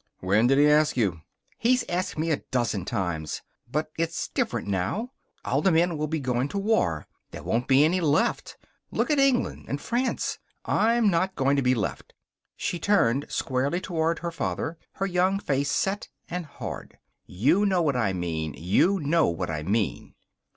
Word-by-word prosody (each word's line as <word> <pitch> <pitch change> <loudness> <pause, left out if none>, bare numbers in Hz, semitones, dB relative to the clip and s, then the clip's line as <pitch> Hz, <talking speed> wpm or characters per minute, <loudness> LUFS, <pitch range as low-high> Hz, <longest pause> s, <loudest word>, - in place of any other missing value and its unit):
"When 100 +6 +3
did 135 +2 +4
he 145 +1 +6
ask 150 -1 +4
you?" 95 -8 0 0.4
"He's 250 +1 +3
asked 180 -1 -2
me 160 +1 0
a 150 - 0
dozen 110 -7 -1
times. 85 -6 -3 0.3
But 155 +2 -1
it's 165 0 -2
different - - -2
now. 100 - -1 0.3
All - - +1
the 190 - +3
men 170 +1 +3
will 155 0 -2
be 160 +1 -2
going 125 -1 0
to 200 - -5
war. 195 - +1 0.2
There - - -9
won't 120 +3 -1
be 135 +2 +6
any 180 +3 +1
left. 150 -2 +1 0.3
Look - - 0
at 295 - +3
England 275 -3 +2
and 140 - -3
France. 245 - -1 0.3
I'm 230 -1 +3
not 185 +2 0
going 135 +1 +2
to 140 - +2
be 125 0 +3
left." 105 -5 -4 0.4
She 175 - -2
turned 145 - +2
squarely 135 +6 -1
toward 165 -3 -1
her 170 0 -4
father, 165 0 -3
her 195 - -2
young 185 +1 +2
face 140 -7 -1
set 195 +8 -1 0.2
and 175 -2 -4
hard. 145 - -8 0.3
"You 145 - +2
know 185 -3 +2
what 145 -4 +1
I 110 -6 +1
mean. 80 -4 -3
You 140 - +2
know 160 +1 +2
what 85 -1 -2
I 75 -1 -3
mean." 100 +4 -2
150 Hz, 180 wpm, -26 LUFS, 115-180 Hz, 0.4 s, he